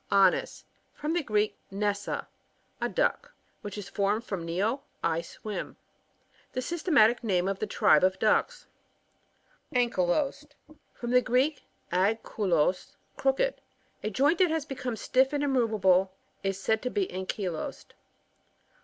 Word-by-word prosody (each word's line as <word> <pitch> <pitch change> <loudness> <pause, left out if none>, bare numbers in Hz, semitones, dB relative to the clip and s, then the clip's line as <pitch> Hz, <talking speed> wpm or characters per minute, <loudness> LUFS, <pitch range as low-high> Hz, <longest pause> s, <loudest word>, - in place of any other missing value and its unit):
Anas. 195 -2 +3
— - - -42
From 300 +2 -2
the 345 - +1
Greek, 215 -5 0
nessa, 200 +1 -2 0.5
a - - 0
duck, - - 0 0.3
which 205 0 -7
is 205 -2 -6
formed 205 +2 0
from 185 -7 -5
tied, 200 +10 0 0.2
I 165 0 +1
swim. 210 +4 -7 0.8
The - - -2
sy^tematic 265 - +3
name 185 -4 +1
of 195 0 -2
the 215 - -2
tribe 155 - +4
of 185 0 +3
ducks. 485 - +1 1.1
Anchtlosed. 250 +6 0 0.2
— - - -35
From 240 0 -4
the 250 0 +6
Greek, 265 +5 +1 0.3
a^ 195 +5 +3
kulos, 180 -3 0 0.2
crooked. 275 - +1 0.4
A 215 - -1
joint 285 - +2
that 365 -2 +5
has 320 -2 -1
become 255 -4 -4
stiff 260 +5 +2
and 290 0 0
immoveable 215 -8 +3 0.3
is 195 0 -2
said 220 +3 +1
to 250 - -2
be 395 +7 0
anchylosed. 185 -2 -4
220 Hz, 140 wpm, -28 LUFS, 195-275 Hz, 1.1 s, the